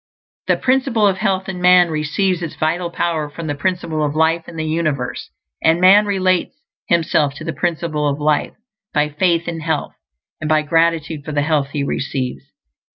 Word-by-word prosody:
_The - - +2
Principle 260 -4 +2
of 195 -2 +2
Health 190 -3 0
in 185 -2 -5
man 180 -1 +5
receives 165 +4 0
its 165 - -5
vital 170 +3 -1
power 165 -3 -2
from 165 +3 -8
the 145 - -2
Principle 160 0 -2
of 145 0 -1
Life 160 +1 +1
in 170 - -11
the 160 -1 -3
universe; 155 -5 -2 0.3
and 160 +1 +3
man 200 +3 +6
relates 185 -2 0 0.3
himself 155 -4 +1
to 145 - -8
the 165 0 -3
Principle 155 -1 -1
of 140 0 -1
Life 150 0 0 0.4
by 150 0 +2
faith 170 +2 +1
in 165 -1 -3
health, 160 -1 -2 0.5
and 155 - -4
by 155 -1 +3
gratitude 165 -1 +1
for 155 - -6
the 145 0 +1
health 145 -3 0
he 145 - -1
receives. 135 -2 -3
160 Hz, 180 wpm, -19 LUFS, 150-180 Hz, 0.5 s, man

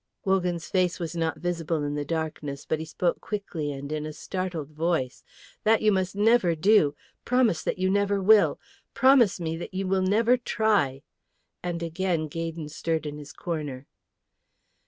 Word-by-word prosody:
Wogan's 180 -4 0
face 185 -2 +1
was 170 -1 -4
not 165 -1 -1
visible 165 -3 -2
in 145 0 -2
the 145 0 -2
darkness; 150 -3 -4
but 155 - -1
he 160 - -4
spoke 170 +2 -1
quickly 175 -8 -4
and 140 +1 -6
in 155 -1 -2
a 155 - -6
startled 180 -4 -4
voice, 155 -5 -1 0.4
"That 220 0 +3
you 215 - +5
must 190 -1 0
never 210 -4 +4
do. 160 -3 +4 0.3
Promise 240 -9 +2
that - - -1
you 185 0 +1
never 200 +1 +2
will! 210 +2 +5 0.4
Promise 260 -8 +5
me 165 -1 -2
that 175 +2 -8
you 195 +1 -1
will 190 0 +2
never 225 +6 +3
try;" 210 - +1 0.6
and 170 -1 -3
again 165 -1 -1
Gaydon 165 0 -5
stirred 160 0 -2
in 150 0 -5
his 145 -1 -10
corner. 145 -6 -5
170 Hz, 165 wpm, -26 LUFS, 155-195 Hz, 0.6 s, you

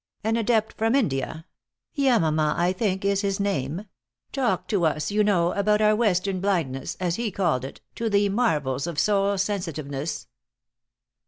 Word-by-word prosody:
An 220 +1 +1
adept 225 -1 +1
from 225 +3 +1
India 160 - -1 0.5
Yamama, 160 - +2
I 175 +2 +2
think, 190 -1 -1
is 200 0 +2
his 195 -1 -1
name 175 -2 -2 0.5
talked 265 -3 0
to 200 -5 +1
us, 155 0 0
you 210 +1 +3
know, 180 -4 +2
about 210 +1 +2
our 215 0 +4
Western 195 -4 +1
blindness, 165 -10 -1
as 180 -2 -1
he 235 -1 -1
called 170 -10 0
it, 135 - -8 0.2
to 230 -1 -1
the 205 0 +3
marvels 155 - 0
of 170 -3 -5
soul 200 +2 +2
sensitiveness." 165 -7 -3
195 Hz, 155 wpm, -25 LUFS, 160-210 Hz, 0.5 s, our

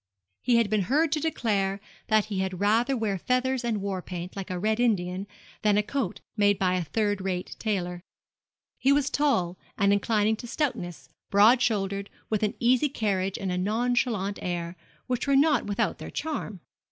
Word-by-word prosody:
He 245 - +2
had 230 -2 +4
been 210 0 +1
heard 300 +3 +3
to 305 - +1
declare 205 -10 0 0.3
that 215 -2 +3
he 205 -3 -3
had 190 -1 -2
rather 230 +6 +2
wear 205 -4 -1
feathers 255 +3 0
and 220 -4 -1
war 195 -2 -2
paint, 180 0 -7
like 195 -2 -5
a 180 - -2
red 215 +4 0
Indian, 195 -5 0 0.3
than 210 -1 +3
a 210 - +3
coat 245 -4 -3
made 205 -2 +3
by 185 -1 +1
a 180 -1 0
third 205 +4 -1
rate 185 -1 -3
tailor. 180 -5 -2 0.8
He 270 - +3
was 280 -1 +2
tall 185 -12 +1 0.2
and 200 -1 +4
inclining 215 +1 +2
to 240 - -8
stoutness, 230 - -3 0.2
broad 220 +5 +6
shouldered, 200 -2 0
and - - -32
with 215 - +1
an 210 -1 0
easy 255 +4 +3
carriage 195 -6 -1
and 190 -2 -3
a 180 - -1
nonchalant 220 -1 0
air, 175 -1 -3 0.3
which 250 +1 -2
were 275 - +4
not 285 -4 +3
without 205 0 -1
their - - -7
charm. 215 - -4
210 Hz, 185 wpm, -27 LUFS, 190-245 Hz, 0.8 s, broad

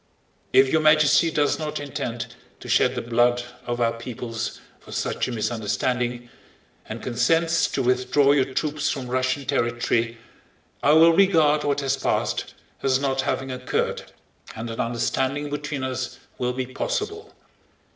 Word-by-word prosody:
If 135 0 +5
Your 160 - +3
Majesty 155 +1 +5
does 145 -1 +1
not 155 -1 -3
intend 140 -5 -5 0.3
to - - -10
shed - - +3
the - - -3
blood 120 +1 +2 0.2
of 120 0 -2
our 115 -1 +2
peoples 115 -1 -5 0.2
for - - -15
such - - -1
a - - -4
misunderstanding, 120 +2 -1 0.6
and 110 +1 -6
consents 165 +8 +2
to 135 - -2
withdraw 130 +3 +3
your 135 -2 +2
troops 150 +2 -1
from 130 -3 -4
Russian 130 +2 0
territory, 120 -3 0 0.6
I 145 - +4
will 165 +1 +7
regard 160 -6 +4
what 145 0 0
has 135 -1 0
passed - - -1 0.3
as 130 -1 +2
not 135 -1 0
having 135 0 -2
occurred 125 0 -2 0.4
and 115 +1 -5
an 115 - -7
understanding 135 +5 -1
between 145 -2 -3
us 130 -1 -3 0.2
will 125 0 0
be 130 0 -2
possible. 425 - -4
130 Hz, 145 wpm, -24 LUFS, 120-150 Hz, 0.6 s, will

